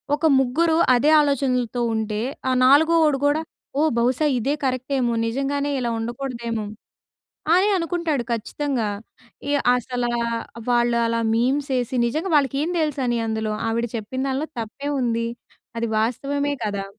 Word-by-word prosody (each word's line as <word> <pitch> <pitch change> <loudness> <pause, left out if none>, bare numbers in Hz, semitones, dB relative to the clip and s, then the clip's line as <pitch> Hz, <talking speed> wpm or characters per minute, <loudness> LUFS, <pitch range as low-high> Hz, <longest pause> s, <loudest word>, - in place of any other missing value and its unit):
ఒక 300 - -2
ముగ్గురు 320 +6 +2 0.2
అదే 280 +5 +3
ఆలోచనలతో 255 -4 0
ఉంటే 215 -1 -2 0.3
ఆ - - +2
నాలుగో‌వోడు 310 +2 +5
గూడా, 290 +2 +2 0.4
ఓ! - - +3 0.2
బహుశా 255 +6 +2
ఇదే 270 +5 0
కరెక్ట్ 255 0 -2
ఏమో 240 -1 +1
నిజంగానే 280 +4 -1
ఇలా 240 -2 -1
ఉండకూడదేమో 235 -1 -4 0.9
అని 375 +3 +4
అనుకుంటాడు 335 -6 -1
ఖచ్చితంగా. 235 +1 -2 0.6
ఈ - - +1 0.2
అసలా 245 0 -2 0.6
వాళ్ళు 240 0 +2
అలా 230 0 0
మీమ్స్ 270 +5 0
ఏసి 245 +1 -2
నిజంగా 310 +10 -2
వాళ్ళకి 275 -2 +1
ఏం 330 - -1
తెలుసని 265 -6 0
అందులో 220 -1 -2
ఆవిడ 230 +1 0
చెప్పిన 225 +4 -5
దాంట్లో 270 +3 -1
తప్పేముంది. 235 0 -2 0.5
అది 230 0 -1
వాస్తవమే 280 +6 -1
కదా! 200 -2 -2
255 Hz, 130 wpm, -22 LUFS, 235-285 Hz, 0.9 s, నాలుగో‌వోడు